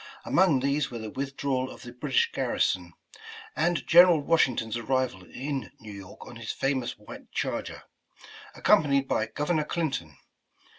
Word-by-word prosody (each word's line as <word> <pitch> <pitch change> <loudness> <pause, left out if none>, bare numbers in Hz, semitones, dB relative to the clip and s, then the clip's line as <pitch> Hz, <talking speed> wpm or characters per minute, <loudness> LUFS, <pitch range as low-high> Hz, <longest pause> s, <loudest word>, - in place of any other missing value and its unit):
Among 160 -9 +3
these 140 +1 0
were 120 - -6
the 110 -2 -6
withdrawal 135 -1 -2
of - - -11
the 120 - -9
British 460 - +1
garri - - -2
son, - - +1 0.6
and 175 0 0
General 175 -1 +7
Washington's 130 -8 +1
arrival 120 -5 -1
in 135 +4 -4
New 110 -1 -10
York 100 -1 -11
on 120 - -10
his 115 -1 -4
famous 135 -3 -1
white 105 - -12
charger, - - -3 0.7
accompanied 140 -3 +3
by 110 - 0
Governor 150 +4 -1
Clinton. 135 - -3
135 Hz, 145 wpm, -27 LUFS, 115-150 Hz, 0.7 s, General